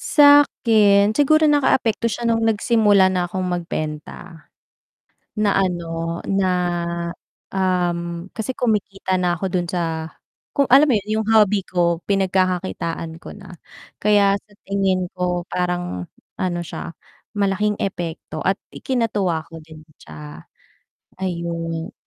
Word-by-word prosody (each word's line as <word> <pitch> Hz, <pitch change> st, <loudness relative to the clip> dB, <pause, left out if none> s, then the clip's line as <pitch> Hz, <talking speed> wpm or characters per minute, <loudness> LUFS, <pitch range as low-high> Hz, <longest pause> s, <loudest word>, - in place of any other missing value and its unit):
Sa'kin, 220 Hz, -8 st, +5 dB
siguro 310 Hz, +2 st, +4 dB
nakaapekto 250 Hz, -6 st, +2 dB
siya 235 Hz, +3 st, -3 dB
nung 225 Hz, 0 st, +1 dB
nagsimula 210 Hz, -3 st, +4 dB
na 180 Hz, -2 st, -1 dB
akong 185 Hz, -1 st, -2 dB
magbenta, 165 Hz, -1 st, -5 dB, 0.9 s
na 210 Hz, -2 st, +1 dB
ano 170 Hz, -3 st, -2 dB
na 195 Hz, -1 st, +1 dB, 1.0 s
um, 175 Hz, -2 st, -1 dB
kasi 235 Hz, +5 st, -4 dB
kumikita 200 Hz, -5 st, -1 dB
na 180 Hz, -1 st, +1 dB
ako 185 Hz, +2 st, -3 dB
dun 175 Hz, -1 st, -1 dB
sa 165 Hz, -2 st, -3 dB, 0.4 s
kung 280 Hz, -1 st, +1 dB
alam 275 Hz, +4 st, +7 dB
mo 275 Hz, -, +2 dB
yun 215 Hz, 0 st, -1 dB
yung 220 Hz, -, -6 dB
hobby 210 Hz, -3 st, +4 dB
ko, 170 Hz, -2 st, +1 dB
pinagkakakitaan 180 Hz, -, -1 dB
ko -, -, -10 dB
na, 190 Hz, -4 st, -12 dB, 0.4 s
kaya 200 Hz, -1 st, +3 dB
sa 205 Hz, +1 st, -23 dB, 0.2 s
tingin 190 Hz, -2 st, 0 dB
ko 180 Hz, -1 st, -1 dB
parang 175 Hz, -, -2 dB, 0.3 s
ano 175 Hz, -2 st, -1 dB
siya 170 Hz, 0 st, -7 dB, 0.4 s
malaking 205 Hz, 0 st, +1 dB
epekto 170 Hz, -4 st, -4 dB
at 190 Hz, 0 st, +1 dB
ikinatuwa 210 Hz, -10 st, -1 dB
ko 165 Hz, -, -10 dB
din 155 Hz, 0 st, -13 dB, 0.2 s
siya, 75 Hz, 0 st, -11 dB, 0.8 s
ayun. 170 Hz, -2 st, -3 dB
185 Hz, 120 wpm, -21 LUFS, 170-210 Hz, 1.0 s, alam